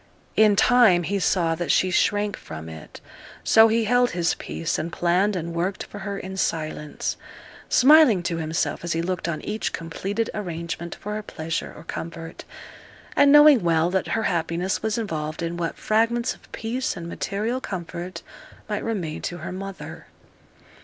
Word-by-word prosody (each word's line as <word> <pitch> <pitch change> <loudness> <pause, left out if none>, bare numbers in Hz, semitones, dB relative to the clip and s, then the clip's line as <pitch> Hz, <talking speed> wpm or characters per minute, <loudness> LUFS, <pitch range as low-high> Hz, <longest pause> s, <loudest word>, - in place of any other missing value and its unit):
In 215 -1 +5
time 220 -6 +5
he 200 +4 -1
saw 175 -3 +2
that 170 +1 -1
she 185 - +3
shrank 205 +3 +1
from 80 0 -9
it; 80 -1 -10 0.4
so 225 0 +7
he 225 +1 +2
held 245 +2 +3
his 170 0 +2
peace, 165 - -3
and 165 - -3
planned 180 +5 +1
and 170 -1 -4
worked 180 +3 -2
for 205 - -10
her 200 0 -4
in 190 0 -7
silence, 155 -4 -2 0.5
smiling 265 - +6
to 170 -1 -2
himself 160 +1 -2
as 170 - -1
he 165 - 0
looked 180 -1 -2
on 155 - -3
each 215 +1 -2
completed 195 +7 -3
arrangement 170 -3 -5
for 210 - -6
her 215 - -3
pleasure 165 -5 -4
or - - -11
comfort; 165 0 -7 0.7
and 285 0 +6
knowing 295 -4 +8
well 165 0 +2
that 190 0 0
her 220 - 0
happiness 170 +2 -1
was 220 0 -1
involved 155 -7 -3
in 170 +1 -2
what 170 -1 -3
fragments 230 +3 +1
of - - -21
peace 235 0 -3
and 170 -1 -6
material 215 +8 -2
comfort 175 -2 -6 0.4
might 210 -1 -3
remain 185 -9 -3
to 175 - -4
her 165 - -6
mother. 195 +1 -8
185 Hz, 165 wpm, -24 LUFS, 165-215 Hz, 0.7 s, knowing